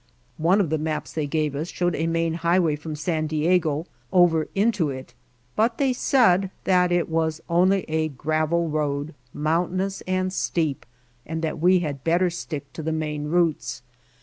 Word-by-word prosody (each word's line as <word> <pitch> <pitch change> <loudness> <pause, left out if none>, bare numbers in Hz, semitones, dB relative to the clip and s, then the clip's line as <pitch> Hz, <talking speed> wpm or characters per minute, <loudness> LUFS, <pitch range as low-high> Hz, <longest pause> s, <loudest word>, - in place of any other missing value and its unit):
One 175 +6 +3
of 175 -7 +1
the 160 - +1
maps 155 0 -3
they 155 -2 -2
gave 150 -1 -1
us 155 +5 -3
showed 175 -1 0
a 160 +2 -1
main 165 0 0
highway 170 -1 +2
from 155 +1 -6
San 155 0 -1
Diego 155 0 +1 0.3
over 170 -3 +4
into 200 -6 +2
it, 130 -1 -7 0.4
but 230 +2 +2
they 270 -2 +2
said 195 -8 +3
that 180 -1 +3
it 175 -1 +2
was 160 -1 0
only 185 +3 +3
a 155 0 0
gravel 155 +4 0
road, 150 0 -2 0.2
mountainous 180 +6 -1
and 185 0 0
steep, 155 -10 -1 0.4
and 160 +3 -5
that 160 - -2
we 180 +2 +4
had 145 -5 -4
better 175 +2 +2
stick 160 -4 -6
to - - -6
the 160 +1 -2
main 150 -2 -2
routes. 150 -8 0
165 Hz, 170 wpm, -24 LUFS, 155-180 Hz, 0.4 s, over